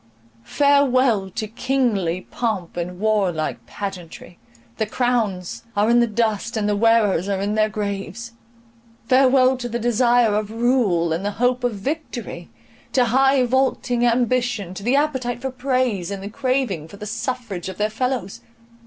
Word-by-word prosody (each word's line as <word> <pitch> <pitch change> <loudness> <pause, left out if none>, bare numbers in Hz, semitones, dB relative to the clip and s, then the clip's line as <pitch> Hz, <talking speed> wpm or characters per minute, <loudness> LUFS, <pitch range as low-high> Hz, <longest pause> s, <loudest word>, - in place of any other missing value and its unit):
—farewell 255 - +3
to 215 +3 -4
kingly 225 -7 0
pomp 210 -8 -2
and 175 +1 -4
warlike 190 - 0
pageantry; 180 -1 -8 0.4
the 220 - -1
crowns 220 -7 -1
are 210 +3 +3
in 240 - +5
the 235 - +3
dust, 225 0 -1
and 210 -1 0
the 210 - +1
wearers 210 -4 +3
are 195 -1 0
in 200 +2 -1
their 215 0 +2
graves!—farewell 235 +5 -1
to 245 -1 -5
the 235 - -2
desire 240 -1 +3
of 210 0 -1
rule, 225 -8 +1
and 170 +4 -3
the 205 - 0
hope 250 +1 +1
of 245 -3 0
victory; 285 +11 -5 0.4
to 250 -2 +3
high 270 0 +4
vaulting 250 -1 +1
ambition, 240 -5 +1
to 190 - -8
the 240 +6 +1
appetite 260 -5 0
for 265 +1 -4
praise, 255 -8 -1
and 200 -1 -5
the 200 - -5
craving 255 - -1
for 200 - -13
the 210 - -7
suffrage 215 -5 -4
of 190 - -8
their 210 +1 0
fellows! 250 -4 -3
230 Hz, 155 wpm, -22 LUFS, 200-250 Hz, 0.4 s, in